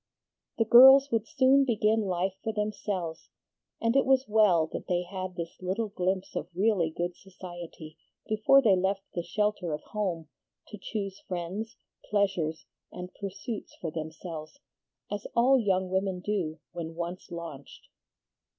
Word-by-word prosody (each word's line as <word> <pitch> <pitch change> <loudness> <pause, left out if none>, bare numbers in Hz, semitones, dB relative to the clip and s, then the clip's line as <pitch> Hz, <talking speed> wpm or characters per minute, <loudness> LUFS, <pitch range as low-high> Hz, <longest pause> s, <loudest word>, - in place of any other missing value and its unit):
The 225 - +2
girls 265 +4 +9
would 225 -1 0
soon 265 +3 +4
begin 220 -3 +2
life 185 -1 -1
for 220 - -1
themselves, 205 -6 -3 0.5
and 230 +2 +1
it 275 - +5
was 265 0 +3
well 210 -7 +4
that - - -5
they 180 0 +1
had 185 0 -6
this 170 -1 -5
little 195 +4 -2
glimpse 190 -1 -2
of 170 - -3
really 190 -4 +2
good 175 +2 -3
society 175 -4 -10 0.3
before 220 +6 +4
they 205 -5 +5
left 190 +1 0
the 175 - -1
shelter 190 -1 -1
of 150 - -5
home 180 -7 -3 0.4
to 210 - -9
choose 200 -3 -4
friends, 190 +6 -4 0.3
pleasures, 190 -6 0 0.3
and 180 0 -8
pursuits 200 +3 -6
for 165 - -4
themselves, 160 - -7 0.5
as 205 -1 -4
all 255 +3 +5
young 190 -4 0
women 190 -1 0
do 180 -5 -2
when 165 -2 -6
once 175 +2 -5
launched. 165 -6 -9
190 Hz, 145 wpm, -29 LUFS, 175-215 Hz, 0.5 s, girls